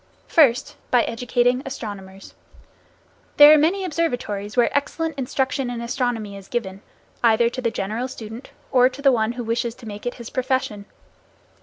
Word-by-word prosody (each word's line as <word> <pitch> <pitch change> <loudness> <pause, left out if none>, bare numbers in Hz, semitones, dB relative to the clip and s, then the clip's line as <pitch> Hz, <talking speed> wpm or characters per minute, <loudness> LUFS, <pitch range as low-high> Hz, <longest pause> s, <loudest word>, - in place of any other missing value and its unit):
First, 265 -7 +3
by 245 -2 +4
educating 245 +2 0
astronomers. 200 -8 -8 1.0
There 295 +1 +10
are - - +7
many 370 +6 +1
observatories 245 - -3
where 240 - +3
excellent 320 +2 -1
instruction 265 -1 -1
in 240 -1 -4
astronomy 235 -4 -2
is 195 -1 -11
given, 200 -5 -4 0.4
either 235 0 +4
to 255 - -5
the 235 - +1
general 220 +4 -3
student 230 -1 -9 0.2
or 255 -1 +5
to 275 +1 +2
one 225 -1 +1
who 245 0 -5
wishes 230 0 -2
to 245 - -14
make 210 +2 -7
it 245 - -3
his 235 -2 -9
profession. 255 -6 -2
245 Hz, 155 wpm, -22 LUFS, 220-260 Hz, 1.0 s, There